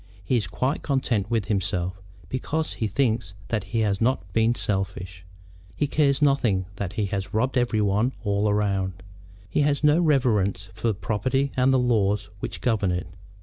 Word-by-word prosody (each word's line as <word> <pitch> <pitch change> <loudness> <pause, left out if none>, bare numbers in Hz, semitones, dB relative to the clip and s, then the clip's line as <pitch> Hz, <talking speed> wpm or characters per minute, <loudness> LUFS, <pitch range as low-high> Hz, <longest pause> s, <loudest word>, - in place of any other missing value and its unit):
He 125 - 0
is 105 -6 0
quite 130 - -1
content 120 -7 0
with 115 -4 0
himself, 95 -2 -1 0.3
because 155 - -2
he 110 - -2
thinks 110 -3 0
that 110 -2 -1
he 115 -1 -1
has 100 -1 0
not 125 -3 +2
been 115 +1 +3
selfish. 95 -3 -3 0.5
He 145 - +1
cares 145 0 +2
nothing 120 -10 +2
that 100 -2 -3
he 105 -1 0
has 100 0 -4
robbed 130 +4 +1
every 120 -3 +2
one 105 +5 +1
all 100 +1 +1
round. 95 -3 -1 0.4
He 150 - 0
has 145 0 +1
no 150 +2 +5
reverence 110 - +2
for 115 +3 0
property 130 +7 -1
and 130 +1 +3
the 130 - +4
laws 105 -5 +1
which - - -5
govern 105 -6 +1
it. 90 +1 -2
110 Hz, 170 wpm, -25 LUFS, 100-130 Hz, 0.5 s, no